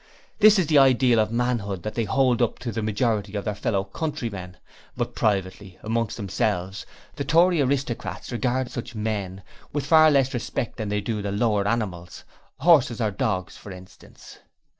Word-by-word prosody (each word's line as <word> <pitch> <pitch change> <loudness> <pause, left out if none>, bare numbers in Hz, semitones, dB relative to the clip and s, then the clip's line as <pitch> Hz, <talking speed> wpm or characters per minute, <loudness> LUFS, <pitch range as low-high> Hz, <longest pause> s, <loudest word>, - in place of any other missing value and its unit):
This 215 0 +7
is 185 - +2
the 150 -1 +4
ideal 130 -3 +4
of 110 0 +1
manhood 115 -6 -1
that 110 - -4
they 115 - -1
hold 125 +2 +2
up 120 - +1
to 125 -2 -5
the 110 +1 -3
majority 105 -1 -1
of 100 - -3
their 105 - -1
fellow 100 -1 -1
countrymen, 100 - -5 0.4
but - - -2
privately 95 -2 -2
amongst 115 0 -2
themselves 95 -2 -2 0.3
the 140 - -2
Tory 165 +3 +3
aristocrats 130 -3 -2
regard 125 +1 -1
such 120 -2 -7
'men' 100 -3 -3 0.3
with 145 -2 -3
far 155 +1 +6
less 135 -3 +2
respect 120 0 -4
than 110 -3 -4
they 105 0 -1
do 105 0 -3
the 100 -1 -3
lower 105 -1 +1
animals. 95 -7 -3 0.4
Horses 145 -9 +4
or 110 -3 0
dogs, 95 -1 -2
for 100 - -11
instance. 90 0 -14
110 Hz, 170 wpm, -24 LUFS, 100-130 Hz, 0.4 s, This